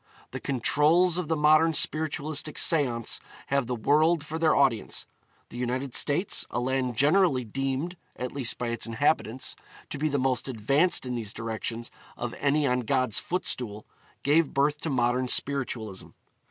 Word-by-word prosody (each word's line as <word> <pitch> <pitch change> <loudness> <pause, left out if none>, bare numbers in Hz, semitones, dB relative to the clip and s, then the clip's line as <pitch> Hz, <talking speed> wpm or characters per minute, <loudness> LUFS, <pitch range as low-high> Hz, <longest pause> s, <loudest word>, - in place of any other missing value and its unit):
The - - -5
'controls' 155 +7 +2
of 175 - -3
the 160 - +1
modern 155 +2 +4
spiritualistic 155 0 0
seance 125 -8 +2 0.3
have 140 -3 +1
the 125 - -2
world 155 +7 +2
for 160 +1 -5
their 160 -1 +3
audience. 130 -6 +1 0.4
The - - -9
United 125 +1 -2
States, 165 +7 +2
a 120 - -2
land 125 -1 -1
generally 150 -1 +3
deemed 135 +8 -3 0.2
at 125 0 -4
least 135 -4 -2
by 120 - -3
its 115 0 -2
inhabitants 130 0 0 0.4
to 145 - -5
be 155 +1 +1
the 145 - 0
most 130 -1 0
advanced 135 - +2
in 125 - -3
these 110 -4 -4
directions 115 +1 -5 0.3
of 120 -1 -4
any 145 +1 +2
on 125 -2 +2
God's 130 -1 0
footstool, 125 - -3 0.4
gave 150 +2 +2
birth 145 +2 +1
to 160 - -3
modern 125 -1 +1
spiritualism. 120 -8 -1
135 Hz, 155 wpm, -27 LUFS, 120-155 Hz, 0.4 s, modern